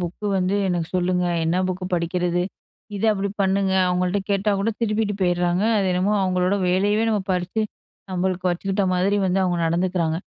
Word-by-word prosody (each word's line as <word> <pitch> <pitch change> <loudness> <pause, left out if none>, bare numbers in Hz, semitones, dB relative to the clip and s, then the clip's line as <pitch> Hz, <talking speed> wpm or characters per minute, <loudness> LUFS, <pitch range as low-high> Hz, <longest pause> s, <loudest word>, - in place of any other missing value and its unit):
Book 180 +4 -4
வந்து 185 +1 0
எனக்கு 175 -2 -1
சொல்லுங்க! 180 0 +1 0.2
என்ன 165 +2 +1
புக்கு 185 0 -3
படிக்கிறது? 175 +1 0 0.5
இத 200 - -3
அப்படி 200 0 -2
பண்ணுங்க 190 0 +1
அவுங்கள்ட்ட 180 +2 +1
கேட்டா 200 +1 +1
கூட 225 +3 +1
திருப்பிட்டு 215 -2 0
போயிர்றாங்க. 175 +1 +1 0.2
அது 195 - +1
என்னமோ 185 +3 +1
அவுங்களோட 185 +1 +1
வேலையவே 205 +4 +2
நம்ம 210 -2 +1
பறிச்சு 180 +4 -1 0.5
நம்மளுக்கு 185 0 -1
வச்சுக்கிட்ட 195 +3 -1
மாரி 195 +3 +2
வந்து 185 +1 +1
அவுங்க 175 -1 0
நடந்துக்கிறாங்க. 170 -1 0
185 Hz, 155 wpm, -22 LUFS, 180-195 Hz, 0.5 s, வேலையவே